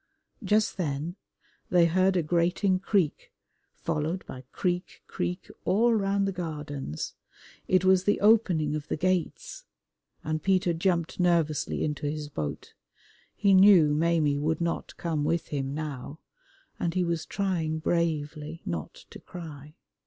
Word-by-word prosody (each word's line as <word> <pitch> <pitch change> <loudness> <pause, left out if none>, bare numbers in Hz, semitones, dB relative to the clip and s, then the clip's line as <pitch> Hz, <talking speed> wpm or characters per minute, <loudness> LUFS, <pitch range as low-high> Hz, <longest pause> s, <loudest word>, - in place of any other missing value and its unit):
Just 210 +1 +2
then 155 0 -2 0.5
they 175 -1 +5
heard 185 +3 +3
a 175 - +1
grating 175 +4 +1
creak, 190 -5 0 0.4
followed 160 +5 -2
by 130 0 -9
creak, 180 0 -2
creak, 180 +2 -4 0.2
all 230 +6 +3
round 200 -2 +1
the - - 0
Gardens. 150 - -5 0.5
It 185 0 +3
was 185 0 +4
the 205 - +2
Opening 190 -9 +3
of 150 0 -5
the - - -2
Gates, 185 0 -1 0.6
and 155 0 -2
Peter 185 -2 +2
jumped 170 0 0
nervously 170 -4 +1
into 150 -1 -2
his 150 0 -4
boat. 75 - -5 0.6
He 200 -2 +3
knew 185 -6 +7
Maimie 155 -2 +2
would 155 +2 0
not 170 0 -3
come 160 -4 -1
with 165 +3 -1
him 135 -2 -2
now, 150 -2 -5 0.6
and 170 0 -1
he 185 - +2
was 170 -2 -2
trying 175 -6 -1
bravely 155 -1 -2
not 80 -3 -4 0.2
to - - -10
cry. 150 -3 -10
170 Hz, 140 wpm, -28 LUFS, 150-185 Hz, 0.6 s, knew